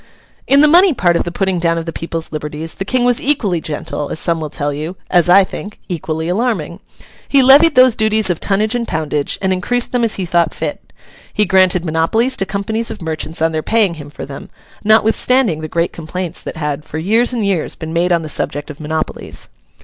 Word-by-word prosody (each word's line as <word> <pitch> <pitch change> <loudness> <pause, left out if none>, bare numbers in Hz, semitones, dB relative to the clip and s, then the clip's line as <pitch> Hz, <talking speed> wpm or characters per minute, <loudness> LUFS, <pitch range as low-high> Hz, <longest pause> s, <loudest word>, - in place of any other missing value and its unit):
In 275 +1 +5
the 305 - +6
money 345 +1 +5
part 175 -6 +2
of - - 0
the 175 - -4
putting 190 0 -1
down 165 0 +1
of 165 - -4
the 165 - -5
people's 165 -1 -5
liberties, 150 +1 -5
the 195 - -5
King 255 +4 +1
was 245 -1 +3
equally 210 - 0
gentle, 150 -1 -5
as - - -4
some 170 -2 +1
will 155 - -4
tell 145 -1 -2
you: 155 +5 -5
as 175 -1 +3
I 195 +2 +7
think, 205 +2 -8
equally 160 -2 -3
alarming. 180 -4 -1 0.5
He 275 -2 +5
levied 290 +5 +6
those 255 -2 +6
duties 215 -2 +2
of 170 - -3
tonnage 210 +3 0
and 240 -1 -2
poundage, 150 -3 -2
and 190 0 +2
increased 245 +7 0
them 245 -1 0
as 230 - +2
he 190 - -3
thought 170 -2 +1
fit. - - -5 0.4
He 210 - +1
granted 185 -2 +3
monopolies 175 +11 +1
to 195 - -2
companies 220 +3 -2
of - - -7
merchants 160 -1 -3
on 165 - +2
their 155 -1 -2
paying 215 -1 +1
him 145 -3 -10
for 145 - -8
them, 135 0 -9 0.3
notwithstanding 220 -3 +3
the 155 - -4
great 170 +2 -1
complaints 170 +1 -6
that - - -7
had, 150 -1 -3
for 155 0 -7
years 220 +10 +2
and 235 -4 -1
years, 190 -5 -1
been 160 0 -7
made 175 +2 +1
on 170 -1 +2
the - - -6
subject 145 0 -3
of 150 - -13
monopolies. 155 +1 -5
180 Hz, 220 wpm, -16 LUFS, 160-220 Hz, 0.5 s, I